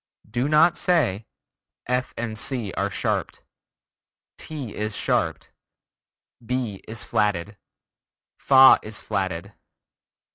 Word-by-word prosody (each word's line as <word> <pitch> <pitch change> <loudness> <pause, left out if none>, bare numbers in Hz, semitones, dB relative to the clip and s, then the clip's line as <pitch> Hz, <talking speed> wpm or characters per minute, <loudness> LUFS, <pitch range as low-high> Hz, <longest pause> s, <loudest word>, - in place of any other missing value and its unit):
Do 120 +6 -1
not 165 +3 +4
say: 120 - +1 0.6
"F 125 0 -1
and 115 -2 -3
C 110 -3 -2
are 100 +2 -1
sharped," 90 - -2 0.9
"ti 140 -8 -7
is 105 0 -3
sharped," - - -1 0.9
"B 120 -4 -3
is 110 +1 -4
flatted," 105 -1 -1 0.8
"fa 135 -1 +7
is 110 0 -7
flatted." 95 -1 -3
110 Hz, 100 wpm, -24 LUFS, 100-130 Hz, 0.9 s, fa